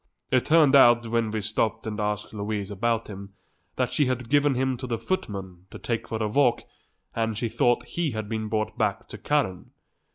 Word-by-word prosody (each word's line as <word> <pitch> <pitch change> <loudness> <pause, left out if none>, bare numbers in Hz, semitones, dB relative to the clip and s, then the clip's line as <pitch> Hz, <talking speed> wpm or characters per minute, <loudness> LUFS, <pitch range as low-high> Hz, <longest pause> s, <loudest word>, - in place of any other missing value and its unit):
It 130 -1 +3
turned 155 -4 +5
out, 120 -3 +6
when 115 -1 0
we 110 0 -2
stopped 110 +2 -1
and 110 -1 -4
asked 105 0 -2
Louise 105 -1 -3
about 115 +3 -1
him, 100 -1 -9 0.4
that - - -1
she 145 - +2
had 125 -1 -3
given 145 -1 +3
him 130 +1 0
to 130 - -6
the 115 -2 -1
footman 100 - -4
to - - -9
take 115 -2 -3
for 110 - -3
a - - +1
walk 125 +2 +2 0.5
and 115 -2 -1
she 115 - -1
thought 120 +2 +1
he 170 -2 -2
had 110 -4 -4
been 110 0 -3
brought 110 0 -2
back - - 0
to - - -9
Karen. 140 -12 -1
115 Hz, 200 wpm, -26 LUFS, 105-130 Hz, 0.5 s, out